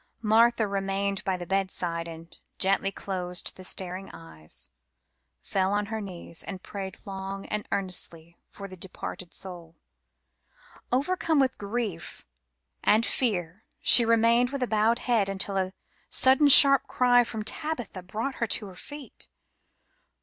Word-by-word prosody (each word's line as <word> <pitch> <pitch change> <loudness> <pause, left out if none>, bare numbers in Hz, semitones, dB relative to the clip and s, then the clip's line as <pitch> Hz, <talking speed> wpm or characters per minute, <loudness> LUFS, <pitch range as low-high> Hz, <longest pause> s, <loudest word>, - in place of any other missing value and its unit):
Martha 225 +1 +4
remained 195 0 -2
by 190 -1 -1
the 175 - -7
bedside, 175 -3 -1
and 165 0 -11 0.2
gently 195 0 +1
closing 180 -3 -4
the 185 - -11
staring 185 +1 -4
eyes, 80 - -9 0.7
fell 190 0 0
on 205 0 0
her 220 - -3
knees, 175 -4 -8
and 190 -1 -8
prayed 195 -2 -7
long 195 0 -6
and 210 0 -4
earnestly 170 -4 -4
for 200 - -9
the 185 - -10
departed 185 -1 -7
soul. 170 -3 -6 1.2
Overcome 320 +4 +1
with 265 -1 +1
grief 205 -5 -5 0.6
and 220 +2 +3
fear 190 -5 -2 0.2
she 240 - +7
remained 230 +2 +3
with 265 -2 -2
bowed 220 +1 +2
head 230 -6 0
until 195 0 -3
a 190 -1 0 0.4
sudden 265 +3 +4
sharp 275 0 +10
cry 245 -1 +4
from 220 -2 -5
Tabitha 245 -4 -4
brought 220 +9 -4
her 235 - +1
to 210 - +1
her 190 -2 -11
feet. 290 +8 -9
195 Hz, 135 wpm, -27 LUFS, 185-230 Hz, 1.2 s, sharp